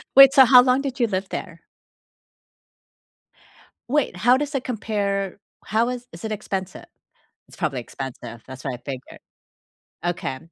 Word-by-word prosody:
Wait, 275 0 +10
so 265 -1 +8
how 250 0 +8
long 255 +1 +3
did 270 -2 -5
you 235 - +3
live 190 -1 -2
there? 170 -3 -7 2.3
Wait, 290 -8 +1
how 245 +8 +4
does 290 +1 -3
it 265 - -1
compare? 200 -5 -2 0.3
How 225 +3 +1
is 245 0 -6
is 170 - -11
it 220 - -4
expensive? 195 -3 -5 0.6
It's - - -16
probably 130 - -2
expensive 120 -2 -8
that's 130 0 -10
what 130 -2 -2
I - - -5
figured. 130 0 -8 0.8
Okay, 175 -6 -2
205 Hz, 150 wpm, -23 LUFS, 165-250 Hz, 2.3 s, Wait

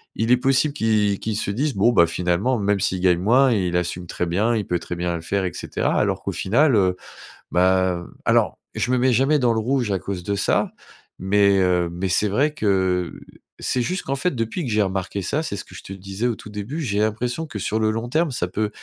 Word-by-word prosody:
il 115 +2 0
est 125 - +6
possible 135 +3 +2
qu'ils 105 -5 +1
qu'ils 110 -1 -3
se 100 - -1
disent: 135 +6 -1
«Bon, 100 +5 +4
bah, 85 -7 +5
finalement, 90 +9 0
même 100 0 +1
s'il 95 0 -1
gagne 90 -2 +3
moins, 125 +8 +4
il 90 -5 +1
assume 90 0 -3
très 90 - -2
bien, 105 +7 +1
il 105 - -1
peut 90 -1 -1
très 90 - -6
bien 85 0 -2
le 85 - -5
faire 95 +3 -1
et 90 - -3
cetera», - - -1
alors - - 0
qu'au - - -2
final 125 +7 +2
heu, 95 -3 +2 0.5
bah, 95 0 +3
hem - - -15
alors, - - +2 0.2
je - - -1
me 130 - +3
mets 125 +1 +3
jamais 135 +6 +3
dans 120 -3 +2
le 110 - 0
rouge 120 -1 0
à 95 - 0
cause 90 -2 -5
de 100 - -2
ça, 100 - +1 0.5
mais, 100 +1 +3
heu, 90 -2 +2
mais 90 +2 -3
c'est 105 +4 +2
vrai 145 +9 +1
que 95 - 0 0.5
c'est 125 - 0
juste 180 +10 -2
qu'en 135 - -2
fait 180 +7 0
depuis 115 +9 -2
que 120 - -3
j'ai 105 0 +3
remarqué 95 +1 -3
ça, 145 - -1
c'est 100 - -4
ce - - -7
que - - -16
je 90 - -8
te - - -10
disais 100 +5 -3
au 120 - -1
tout 105 - -11
début, 105 +10 -5
j'ai 105 -7 -1
l'impression 120 +8 -1
que 130 - -7
sur 110 +3 -1
le 110 0 +2
long 115 +2 -3
terme, 155 +5 +1
ça 90 -7 -2
peut 105 +4 -2
105 Hz, 245 wpm, -22 LUFS, 95-120 Hz, 0.5 s, est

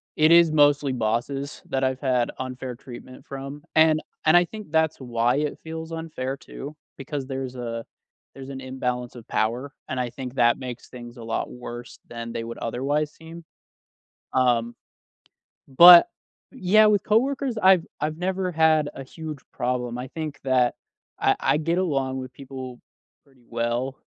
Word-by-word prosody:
it 155 +1 +4
is 170 -1 +7
mostly 145 -2 +4
bosses 130 +5 -2
that 135 0 -1
I've 130 0 0
had 125 -3 +1
unfair 130 -1 -5
treatment 130 0 -12
from. 140 +2 -7
And 155 0 +5 0.2
and 155 +2 +7
I 175 - +5
think 210 -4 -10
that's 160 -1 +2
why 120 0 +1
it 150 -1 -2
feels 160 0 -6
unfair 145 -5 -4
too. 145 +3 -9 0.2
Because 135 0 -5
there's 130 -1 -4
a 115 -2 -4 0.5
there's 135 0 -9
an 135 -1 -7
imbalance 125 -2 -3
of 120 -3 -12
power, 125 +6 -1 0.2
and 130 - -2
I 125 -1 -1
think 125 +1 -7
that 120 +1 +3
makes 125 -2 -7
things 120 0 -11
a 115 - -9
lot 115 0 -3
worse 120 0 -9
than 115 -1 -7
they 115 0 -4
would 115 - -7
otherwise 145 +6 -1
seem. 165 +1 -12 0.9
Um 120 -2 +2 1.0
But 175 - +11 0.4
Yeah, 215 -3 +4
with 205 -2 +3
coworkers, 255 +2 +1
I've 185 -3 +6 0.2
I've 155 +1 -1
never 185 +1 -1
had 160 -2 +3
a 135 - -8
huge 155 +2 -8
problem. 125 -1 -2
I 125 +1 -5
think 155 -3 -6
that 130 -2 +2 0.4
I - - +3
I 150 - +2
get 165 +3 0
along 135 -7 0
with 130 -1 -8
people 130 -2 -8 0.5
pretty 135 -3 -26
well. 120 +3 -2
135 Hz, 160 wpm, -24 LUFS, 125-160 Hz, 1.0 s, But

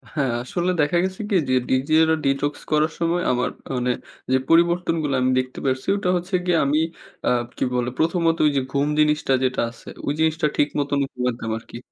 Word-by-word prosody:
হ্যাঁ, 140 -5 +1
আসলে 175 +8 -1
দেখা 150 +4 +2
গেছে 190 +2 -3
কি 205 - +1
যে, - - +2 0.2
ডিজিটাল 155 +5 +3
detox 140 +2 +1 0.2
করার 155 +1 +3
সময় 170 +1 +1
আমার 125 0 0 0.3
মানে 125 0 +1 0.4
যে 130 - +5
পরিবর্তনগুলা 165 -3 +2
আমি 130 - +2
দেখতে 130 0 -4
পারসি, 130 -1 -1
ওটা 190 -3 -1
হচ্ছে 180 +2 -3
গিয়ে 175 -2 +3
আমি 145 +2 +2 0.5
আ - - +4 0.3
কী - - -1
বলে? 125 0 0
১ম 170 +2 +1 0.2
ত - - -16
ওইযে 140 -2 +2
ঘুম 140 +1 +1
জিনিসটা 150 -2 +2
যেটা 130 -1 +1
আছে, 115 - -17 0.2
ওই 140 - +1
জিনিসটা 160 -1 +2
ঠিক 145 - +4
মতন 145 0 0
ঘুমাইতাম 125 -2 -3
আরকি। 115 - -10
145 Hz, 185 wpm, -22 LUFS, 130-165 Hz, 0.5 s, যে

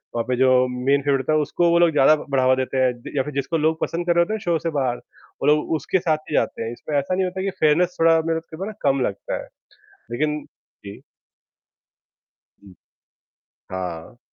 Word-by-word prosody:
वहाँ 115 - 0
पे 125 - 0
जो 130 0 +4 0.2
मेन 130 +3 0
फेवरेट 140 -1 +1
होता 145 +4 -1
है, 155 - +3
उसको 170 +3 +1
वो 170 0 +4
लोग 170 -1 +4
ज़्यादा 150 0 +5
बढ़ावा 130 -1 +3
देते 130 +1 -2
हैं 130 -1 +3 0.2
या 135 - +2
फिर 150 - -7
जिसको 140 +4 -1
लोग 160 +1 +1
पसंद 170 +1 -2
कर 175 -1 +2
रहे 170 - +5
होते 210 - -4
हैं, 220 - -2
शो 175 -4 0
से 165 - -2
बाहर 125 -2 0
वो 135 - -9
लोग 150 0 +2
उसके 185 +4 0
साथ 165 -3 +1
ही - - -5
जाते - - 0
हैं 115 - -4
इसमें 145 +4 -4
ऐसा 140 +6 0
नहीं 190 0 +1
होता 185 +1 -4
कि 195 - -1
फेयरनेस 165 +4 +2
थोड़ा 165 0 +5
मेरे 165 0 0
को 160 -1 -13
तो 190 - -4
ना 215 - -5
कम 140 -1 +2
लगता 100 - -4
है - - -15 0.6
लेकिन 150 +4 -1 0.4
जी। 100 0 -9 1.6
हुँ, 95 -2 -15 1.0
हाँ। 90 +4 -6
150 Hz, 215 wpm, -22 LUFS, 130-165 Hz, 1.6 s, ज़्यादा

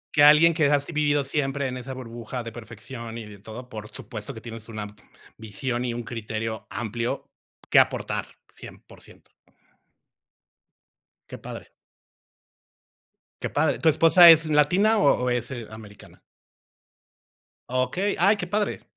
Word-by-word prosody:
Que 145 - +4
alguien, 150 +3 +7
que 155 -2 +1
has 145 -1 +2
vivido 150 -2 0
siempre 140 0 -2
en 130 - -5
esa 130 +1 -7
burbuja 120 0 -7
de 115 - -7
perfección 115 +1 -9
y 115 - -7
de 105 -1 -12
todo, 110 +5 -10
por 110 -3 -9
supuesto, 120 +2 -8
que 110 - -9
tienes 115 -1 -10
una 110 -2 -5 0.5
visión 120 +3 -4
y 120 -1 -3
un 120 - -5
criterio 110 -1 -5
amplio 115 +1 -4 0.4
que - - +7
aportar - - 0 0.3
100% - - -15 2.0
¡Qué - - -8
padre! - - -9 1.7
¡Qué - - -3
padre! 145 0 0
¿Tu 165 - +4
esposa 165 +3 +7
es 165 0 +7
latina 175 +9 +3
o 140 -10 +3
o - - +1
es, 120 +1 -2
eh, 120 -4 -6
americana? 105 -2 -13 1.5
Okey. 130 +11 -1
Ay, 195 +5 +5
¡qué 180 - -4
padre! 205 +2 -2
125 Hz, 140 wpm, -25 LUFS, 115-150 Hz, 2.0 s, alguien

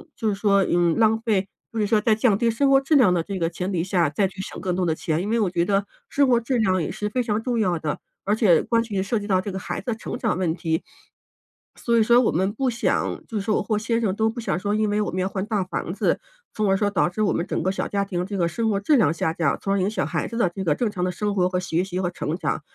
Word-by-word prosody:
就 220 -2 -1
是 - - 0
说， 200 -1 +3
嗯， 175 -2 +2
浪 220 0 +3
费， 205 -4 0 0.2
就 - - -5
是 - - +2
说 215 +1 +3
在 215 +1 +2
降 220 -3 +3
低 235 0 +2
生 270 +5 +2
活 270 0 +6
质 275 +3 +1
量 230 -10 +5
的 175 - +1
这 195 +3 -5
个 165 -2 0
前 180 +2 -4
提 165 - 0
下， 175 -4 +1
再 190 +5 0
去 190 0 -8
省 - - -7
更 180 -1 -1
多 185 - +1
的 160 -1 +1
钱， 160 +1 -1
因 205 - -3
为 230 - +1
我 200 - +1
觉 175 -1 0
得 200 +1 +1 0.2
生 285 - +2
活 240 - +4
质 240 +2 -1
量 185 -4 +2
也 - - -2
是 210 0 -3
非 250 +3 0
常 220 -1 -1
重 245 -3 -1
要 180 -5 +1
的， 155 -2 -3 0.3
而 205 - +2
且 195 -8 +4
关 230 -1 +2
系、 205 -4 -2
涉 220 +3 -1
及 205 - -7
到 185 -3 +2
这 200 +1 -5
个 190 - -4
孩 - - -4
子 - - -28
的 230 - 0
成 230 - -6
长 220 -7 -1
问 170 -4 0
题。 160 -2 -2 1.0
所 235 -1 +2
以 - - +5
说 240 +3 +5
我 - - +2
们 190 +4 0
不 260 +3 0
想 235 -1 -1
就 225 - -8
是 - - -2
说 215 0 +1
我 - - -1
或 215 - 0
先 230 +1 0
生 200 -3 0
都 220 +1 +2
不 235 - -6
想 180 -7 -1
说， 205 +2 -1
因 215 0 +1
为 210 +1 +1
我 - - -1
们 185 - -3
要 185 - 0
换 190 -1 -3
大 210 -3 0
房 185 - -4
子， - - 0 0.3
从 210 -2 0
而 195 - +3
说 205 +1 +1
导 190 -3 +1
致 215 +4 -4
我 200 - +2
们 170 - -1
整 - - -2
个 185 - +1
小 - - -3
家 200 -1 -1
庭 180 -2 -2
这 200 -1 -4
个 170 - +2
生 225 +6 -1
活 200 -2 +1
质 290 +9 +3
量 160 - +4
下 160 -1 -1
降， 165 -4 0
从 195 - 0
而 200 - +1
影 190 - +1
响 220 - -1
孩 - - -2
子 230 - -6
的 235 - +3
这 195 - -4
个 155 -5 +2
正 235 -4 -1
常 180 -3 -3
的 180 - 0
生 205 +3 -2
活 180 -1 +2
和 180 0 -1
学 180 -1 -1
习 185 -1 -4
和 180 -1 -1
成 165 -1 -3
长， - - -2
200 Hz, 340 characters per minute, -23 LUFS, 180-220 Hz, 1.0 s, 活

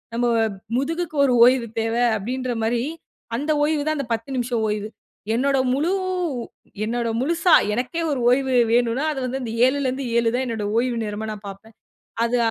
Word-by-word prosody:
நம்ம 240 +1 +1 0.5
முதுகுக்கு 325 +4 -2
ஒரு 255 - +2
ஓய்வு 250 -1 +3
தேவை 225 +2 0 0.2
அப்பிடின்ற 250 +4 -3
மாரி 235 +1 0 0.5
அந்த 295 +4 -1
ஓய்வு 295 -1 +1
தான் 310 - +1
அந்த 275 - -2
10 230 +4 -4
நிமிஷ 245 0 -2 0.2
ஓய்வு. 210 0 -2 0.5
என்னோட 275 +3 +2 0.2
முழு 300 +7 +1 0.9
என்னோட 235 +1 -1
முழுசா 335 +5 +2 0.2
எனக்கே 255 +9 -2
ஒரு 275 - -1
ஓய்வு 260 +1 +2 0.2
வேணுன்னா, 240 +4 +2
அது 275 - -5
வந்து 260 +2 -3
இந்த 225 -2 -4
7ல 275 0 0
இருந்து 260 +1 -2
7 235 -1 +3
தான் 260 +1 0
என்னோட 220 -3 -3
ஓய்வு 245 -1 -1
நேரமா 210 +1 -4
நான் 205 -1 -11
பார்ப்பேன். 210 +3 -13 0.5
அது 240 +1 +1
250 Hz, 170 wpm, -22 LUFS, 230-275 Hz, 0.9 s, ஓய்வு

